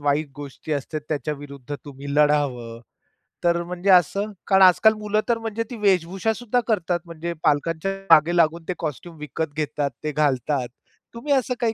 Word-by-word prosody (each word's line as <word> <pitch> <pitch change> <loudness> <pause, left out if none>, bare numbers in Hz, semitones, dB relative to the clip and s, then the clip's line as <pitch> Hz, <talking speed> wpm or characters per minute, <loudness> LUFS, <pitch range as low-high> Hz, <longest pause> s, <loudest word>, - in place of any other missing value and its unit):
वाईट 145 +1 0
गोष्टी 145 +2 -7
असतात, 150 +2 -3
त्याच्या 150 0 -2
विरुद्ध 140 -1 -8
तुम्ही 140 0 -7
लढावं. 140 -6 +1 0.6
तर 170 0 +2
म्हणजे 180 +3 -3
असं 195 +4 +3 0.2
कारण 195 -1 +4
आज-काल 190 +4 +6
मुलं 210 0 0
तर 235 - +3
म्हणजे 225 0 -3
ती - - -4
वेशभूषासुद्धा 205 +5 +1
करतात, 180 -5 0
म्हणजे 170 0 -5
पालकांच्या 160 +5 +1 0.2
मागे 160 +3 +5
लागून 165 0 +2
ते 185 - -1
कॉस्ट्यूम 160 +2 -5
विकत 150 +1 -4
घेतात, 150 -1 -1
ते 155 - -1
घालतात. 140 -3 0 0.5
तुम्ही 280 +5 -1
असं 255 -2 +1
काही 230 -2 +1
165 Hz, 160 wpm, -23 LUFS, 145-195 Hz, 0.6 s, आज-काल